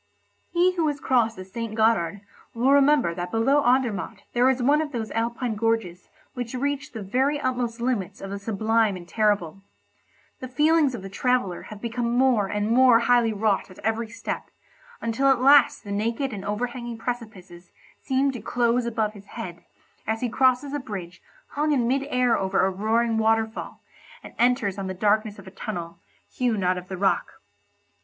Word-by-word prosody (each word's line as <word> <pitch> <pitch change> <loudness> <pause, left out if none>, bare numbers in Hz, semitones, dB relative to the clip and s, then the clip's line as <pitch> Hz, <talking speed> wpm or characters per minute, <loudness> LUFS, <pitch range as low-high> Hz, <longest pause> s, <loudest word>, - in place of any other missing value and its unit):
He 355 +2 +3
who 325 -2 +2
has 290 -1 -2
crossed 235 -5 +1
the 185 - -9
St. 220 +3 -6
Gothard 200 -5 +1 0.3
will 250 +4 +2
remember 280 - +4
that 175 +1 -5
below 270 +8 +2
Andermatt 235 -5 0
there 245 +2 +4
is 260 -1 0
one 290 +4 +4
of 305 -2 -4
those 225 -4 -4
Alpine 235 +1 -2
gorges 215 -5 -2 0.2
which 245 -2 -5
reach 280 +2 -2
the 220 -3 -6
very 265 +9 0
utmost 245 -3 -2
limits 235 -7 -2
of 195 - -7
the 200 - -4
sublime 220 0 +1
and 175 -1 -11
terrible. 195 -3 0 0.8
The 255 - -6
feelings 295 +1 +2
of 200 - -8
the 195 - -7
traveller 200 -3 0
have 210 -1 -10
become 235 0 -1
more 250 -6 +3
and 210 +2 -1
more 245 -1 +6
highly 240 -1 +3
wrought 210 -2 0
at 185 - -14
every 225 +1 0
step, 225 - -6 0.5
until 230 +4 0
at 270 -2 +4
last 275 0 +5
the 205 - -8
naked 230 +6 -1
and 195 -2 -6
overhanging 240 +3 -4
precipices 215 -8 -7 0.3
seem 270 +1 +1
to 245 -4 -7
close 240 +2 +1
above 220 -2 -1
his 200 -2 -13
head, 175 -3 -8 0.4
as 220 +1 -1
he 245 - -1
crosses 260 +3 +2
a 290 - -1
bridge 185 -8 -7 0.3
hung 300 +1 0
in 245 -4 +1
mid 270 +2 0
air 250 -3 +2
over 190 -1 +1
a 190 - +1
roaring 225 +3 +1
waterfall, 220 0 -1 0.4
and - - -11
enters 240 -5 +2
on 195 - -4
the 190 - -4
darkness 210 +2 +1
of 195 - -12
a 190 - -11
tunnel, 175 -5 -6 0.3
hewn 230 -6 -1
out 180 0 +1
of 180 - -13
the 190 - -6
rock. 195 +1 0
230 Hz, 180 wpm, -25 LUFS, 200-255 Hz, 0.8 s, more